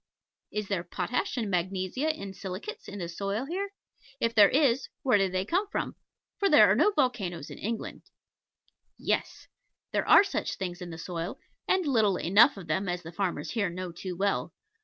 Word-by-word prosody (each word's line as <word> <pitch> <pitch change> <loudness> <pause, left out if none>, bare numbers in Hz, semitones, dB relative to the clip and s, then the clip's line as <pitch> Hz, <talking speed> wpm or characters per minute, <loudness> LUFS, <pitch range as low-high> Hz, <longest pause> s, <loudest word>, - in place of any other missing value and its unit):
Is 210 -1 -3
there 190 -4 -1
potash 235 +9 -2
and 225 -3 -1
magnesia 185 - -1
and 200 -11 -4
silicates 185 +1 -7
in 205 - -7
the 175 -3 -4
soil 200 +7 -3
here? 365 +7 -2
And - - -33 0.5
if 230 -2 +1
there 210 -3 +7
is, 270 -2 +2
where 250 -7 +4
did 195 -1 +1
they 185 +1 -1
come 370 - 0
from? - - -3 0.4
For 400 - +3
there 215 - +7
are - - +4
no 305 - +5
volcanos 245 - -1
in - - -9
England. 225 +2 -4 1.0
Yes. - - -2 0.5
There - - -1
are - - +9
such 395 - -2
things 180 -1 -5
in 180 - -6
the 165 - -7
soil; 170 +1 -5 0.3
and 375 -2 +2
little 220 -9 +3
enough 200 +6 +5
of 190 - -8
them, 180 +4 -1
as 175 0 -3
the 165 - -8
farmers 175 -5 -2
here 210 -5 0
know 180 +1 -5
too 180 +2 -6
well. 200 +1 0
200 Hz, 190 wpm, -29 LUFS, 180-245 Hz, 1.0 s, are